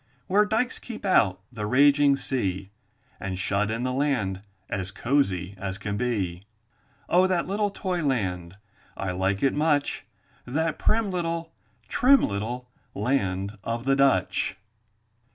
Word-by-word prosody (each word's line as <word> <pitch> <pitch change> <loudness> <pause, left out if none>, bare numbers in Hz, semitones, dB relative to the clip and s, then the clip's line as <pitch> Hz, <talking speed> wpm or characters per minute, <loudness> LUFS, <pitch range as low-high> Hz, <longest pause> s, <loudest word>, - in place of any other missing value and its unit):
Where 205 +3 +4
dykes 240 +4 0
keep 225 -4 -8
out 100 - +3
the 105 -3 -4
raging 140 +3 +5
sea, 100 -8 -2 0.5
And 95 -1 -4
shut 100 +3 0
in 115 +2 -2
the 130 0 -1
land 125 -9 0 0.3
as 95 -1 -3
cozy 100 -5 0
as 95 0 -4
can 100 -1 -4
be. 100 -7 -1 0.7
Oh, 180 +2 +4
that 180 -2 +1
little 205 +2 0
toy 185 -3 -2
land, 95 - -1 0.4
I 95 -1 -2
like 95 +2 0
it 135 - +3
much, 150 -1 0 0.4
That 160 +6 -1
prim 220 -2 +1
little, 170 -2 -3 0.3
trim 275 +2 +5
little, 115 +5 -4 0.3
land 100 -4 -1
of 115 +3 -3
the 135 0 +3
Dutch! 135 -7 +2
125 Hz, 135 wpm, -26 LUFS, 100-160 Hz, 0.7 s, raging